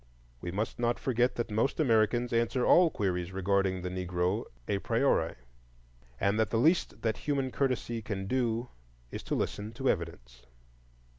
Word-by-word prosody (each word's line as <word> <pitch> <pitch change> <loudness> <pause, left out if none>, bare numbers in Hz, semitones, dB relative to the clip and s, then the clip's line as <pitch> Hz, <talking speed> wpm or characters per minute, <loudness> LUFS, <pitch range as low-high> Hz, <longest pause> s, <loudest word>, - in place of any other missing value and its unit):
We 90 - -4
must 105 +7 -3
not 120 0 +1
forget 125 -2 +1
that 120 -2 -3
most 110 +9 0
Americans 120 -3 +2
answer 115 +2 +1
all 175 -1 +6
queries 90 - -2
regarding 95 -1 0
the 90 - -2
Negro 90 +3 -1 0.2
a 100 - 0
priori, 115 -7 +1 0.8
and 100 +2 +1
that 110 -3 +2
the 110 - 0
least 160 +9 +2
that 110 -1 0
human 135 -3 -1
courtesy 125 -4 -1
can 100 -2 -4
do 120 +1 0 0.4
is - - -5
to - - -2
listen 105 +2 -3
to 130 +3 0
evidence. 80 -9 -6
110 Hz, 155 wpm, -30 LUFS, 95-120 Hz, 0.8 s, all